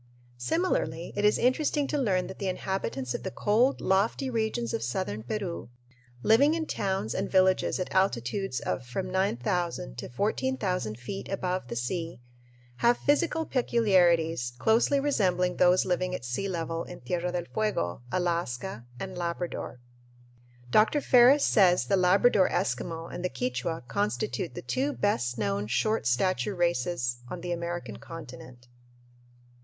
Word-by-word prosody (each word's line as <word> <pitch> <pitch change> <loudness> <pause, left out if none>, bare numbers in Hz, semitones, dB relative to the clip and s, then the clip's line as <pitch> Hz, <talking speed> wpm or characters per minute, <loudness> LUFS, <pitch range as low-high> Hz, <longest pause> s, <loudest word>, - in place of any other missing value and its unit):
Similarly, 170 - -1
it 205 - -1
is 210 0 +4
interesting 285 +3 +1
to - - 0
learn 190 -8 +1
that 190 - -9
the 195 - -2
inhabitants 180 -9 -3
of - - -4
the - - -4
cold, 225 - +2
lofty 220 +8 +1
regions 230 +1 -1
of 230 - -1
southern 185 - -2
Peru, 175 - -4 0.5
living 280 +8 +5
in 325 -1 -2
towns 190 - -2
and - - -2
villages 185 -1 +3
at 185 - -4
altitudes 190 - 0
of 130 - -2
from 185 +10 -4
9000 175 - -1
to - - -6
14,000 185 - -1
feet 125 +11 -6
above 185 -5 -2
the - - -5
sea, 165 +6 -3 0.6
have 235 - +3
physical 320 +2 +1
peculiarities 175 - +2
closely 225 - +3
resembling 180 -10 +1
those 180 +1 +4
living 180 0 0
at 125 - -7
sea 125 +12 -2
level 165 -2 -3
in 175 - -10
Tierra 175 +7 -2
del 175 -1 -2
Fuego, 210 - -1
Alaska, 170 -9 -2
and 190 -1 -5
Labrador. 170 -6 -4 0.9
Dr. 220 - +4
Ferris 260 +1 +6
says 180 -4 +4
the 200 - +2
Labrador 190 +2 +4
Eskimo 165 +6 -2
and 175 - -5
the 180 - 0
Quichua 125 +3 -3
constitute 205 0 -2
the 175 - -6
two 275 +3 -1
"best 125 - 0
known 100 -1 -1
short 135 - 0
stature 185 - +1
races 170 -7 0
on 180 - -6
the 175 - -4
American 175 0 -4
continent." 125 -6 -11
180 Hz, 145 wpm, -28 LUFS, 145-210 Hz, 0.9 s, Ferris